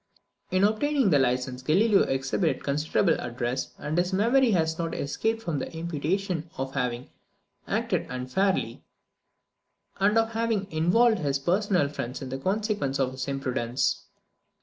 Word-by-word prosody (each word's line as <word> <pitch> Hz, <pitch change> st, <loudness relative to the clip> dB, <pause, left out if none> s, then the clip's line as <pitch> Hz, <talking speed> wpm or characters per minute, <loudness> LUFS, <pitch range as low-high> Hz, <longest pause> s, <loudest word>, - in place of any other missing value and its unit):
In 185 Hz, +1 st, +2 dB
obtaining 240 Hz, +2 st, +2 dB
this 145 Hz, -3 st, +5 dB
license, 125 Hz, 0 st, -1 dB
Galileo 195 Hz, -, +4 dB
exhibited 135 Hz, +6 st, 0 dB
considerable 145 Hz, +2 st, +1 dB
address, 120 Hz, +2 st, -3 dB
and 150 Hz, +1 st, -4 dB
his 180 Hz, +2 st, 0 dB
memory 235 Hz, +7 st, +3 dB
has 160 Hz, -5 st, +1 dB
not 165 Hz, -1 st, -2 dB
escaped 225 Hz, +10 st, -2 dB
from 160 Hz, -7 st, -2 dB
the -, -, -5 dB
imputation 170 Hz, +2 st, -2 dB
of 135 Hz, 0 st, -4 dB
having 125 Hz, -2 st, -2 dB, 0.6 s
acted -, -, -1 dB
unfairly, 130 Hz, +11 st, -1 dB, 1.2 s
and 205 Hz, +3 st, +3 dB
of 225 Hz, 0 st, +2 dB
having 225 Hz, -3 st, 0 dB
involved 190 Hz, +8 st, +3 dB
his 140 Hz, -4 st, 0 dB
personal 180 Hz, +1 st, +1 dB
friends 125 Hz, -3 st, -5 dB
in 135 Hz, -, -6 dB
the 135 Hz, +1 st, -4 dB
consequences 200 Hz, -5 st, -1 dB
of 130 Hz, -1 st, +1 dB
his 130 Hz, 0 st, -5 dB
imprudence. 130 Hz, -3 st, -1 dB
160 Hz, 140 wpm, -27 LUFS, 135-205 Hz, 1.2 s, this